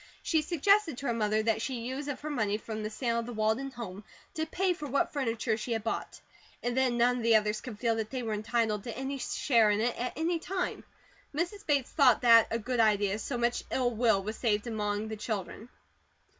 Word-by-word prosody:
She 320 -2 +2
suggested 345 - +2
to 275 - -6
her 240 - +1
mother 215 -1 +1
that 220 0 +1
she 250 +1 -3
use 260 +4 -4
her 290 +2 -4
money 210 -7 0
from 220 0 -6
the 215 - -3
sale 235 +1 -1
of 230 - -5
the 245 - -5
Walden 220 +5 0
home 215 -6 -8 0.3
to 315 0 -2
pay 370 +3 +1
for 300 -4 -7
what 275 +1 0
furniture 230 -5 0
she 230 +1 -3
had 225 -2 -2
bought, 225 - -3 0.4
and 245 0 -1
then 260 -2 +2
none 245 +1 +3
of - - -3
the 230 0 +4
others 215 0 +2
could 245 -6 -8
feel 230 +1 +1
that 220 -1 -3
they 255 -2 -4
were 220 -2 -2
entitled 215 -1 0
to 235 -2 -5
any 270 +1 -3
share 230 -5 +2
in 205 0 +2
it, 235 +2 0
at 250 +1 -3
any 330 +2 0
time. 365 +2 -3 0.5
Mrs. 350 +6 -2
Bates 280 -4 +1
thought 275 -5 +5
that 230 -1 +7
a 230 - 0
good 245 +2 -3
idea, 205 -2 +3
so 245 +2 -3
much 240 0 0
ill 250 -2 +1
will 220 -4 +2
was 215 +2 -4
saved 210 -3 0
among 210 -2 -2
the 220 - -4
children. 215 +2 -5
235 Hz, 225 wpm, -30 LUFS, 220-270 Hz, 0.5 s, that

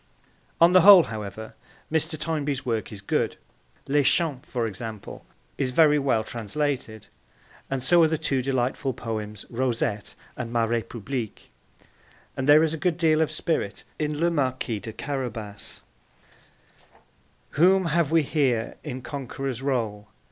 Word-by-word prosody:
On 170 +1 +7
the 185 0 +7
whole, 195 -1 +10
however, 110 -1 -7 0.4
Mr. 160 -1 0
Toynbee's 150 -4 -2
work 115 -3 -2
is 100 -2 -8
good; 100 - -1 0.5
Les 145 +1 +3
Champs, 145 -2 +1
for 120 -2 -1
example, 110 0 -7 0.4
is 135 - +1
very 150 +2 +4
well 130 -6 +1
translated, 115 0 -3 0.6
and 135 -2 -2
so 170 +6 +5
are 160 - +6
the 160 0 -1
two 140 -4 0
delightful 130 +1 -1
poems 105 -3 -5
Rosette 115 -4 -2 0.2
and 120 -2 -5
Ma 120 -1 +1
Republique; 115 +1 -4 0.8
and 130 +2 -2
there 150 +2 +8
is 160 -1 0
a - - -3
good 180 -3 +1
deal 160 -2 +3
of 160 - +2
spirit 155 -9 -2 0.2
in 150 -1 -2
Le 170 +1 +2
Marquis 130 -7 -1
de 110 +3 -7
Carabas: 115 -6 -5 1.7
Whom 185 +4 +4
have 165 -2 +1
we 165 -1 +3
here 130 -6 0
in 130 -4 -6
conqueror's 135 -2 -5
role? 115 -7 -2
130 Hz, 140 wpm, -25 LUFS, 115-155 Hz, 1.7 s, whole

